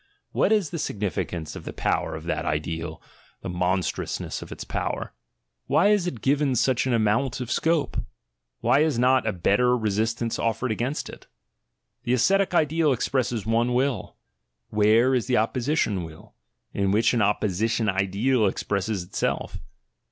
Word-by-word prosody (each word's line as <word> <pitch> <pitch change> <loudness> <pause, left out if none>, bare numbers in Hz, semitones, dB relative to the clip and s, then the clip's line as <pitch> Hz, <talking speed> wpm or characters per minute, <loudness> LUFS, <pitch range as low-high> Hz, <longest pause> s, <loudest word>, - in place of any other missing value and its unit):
What - - +2
is 205 -8 +2
the 170 - -4
significance 90 - -3
of - - -8
the - - -7
power - - -1
of - - -7
that - - -2
ideal, 80 +1 -3 0.4
the - - -5
monstrousness 90 0 -2
of - - -10
its - - -6
power? - - -3 0.5
Why 200 +5 +4
is 205 -4 +2
it 120 -10 -5
given 140 0 +2
such 130 +1 +2
an 130 - +1
amount 115 +4 +1
of 125 -2 -5
scope? 165 -1 +1 0.6
Why 140 - +4
is 155 -4 +2
not 130 +2 +3
a - - +2
better 105 +7 +2
resistance 115 +2 -1
offered 115 +2 -1
against 125 +6 -2
it? - - -12 0.7
The 120 - 0
ascetic 190 +9 +2
ideal 155 -1 +3
expresses 120 -3 -1
one 115 +2 +1
will: 130 -1 -1 0.5
where 110 +5 +4
is 125 -2 0
the 125 -1 +2
opposition 115 - 0
will, 80 -1 -12 0.4
in 100 -1 0
which 105 +5 +3
an 120 - +2
opposi 105 0 +1
tion 115 -1 0
ideal 100 +5 +1
expresses 100 0 -2
itself? 90 - -3
115 Hz, 155 wpm, -25 LUFS, 100-130 Hz, 0.7 s, Why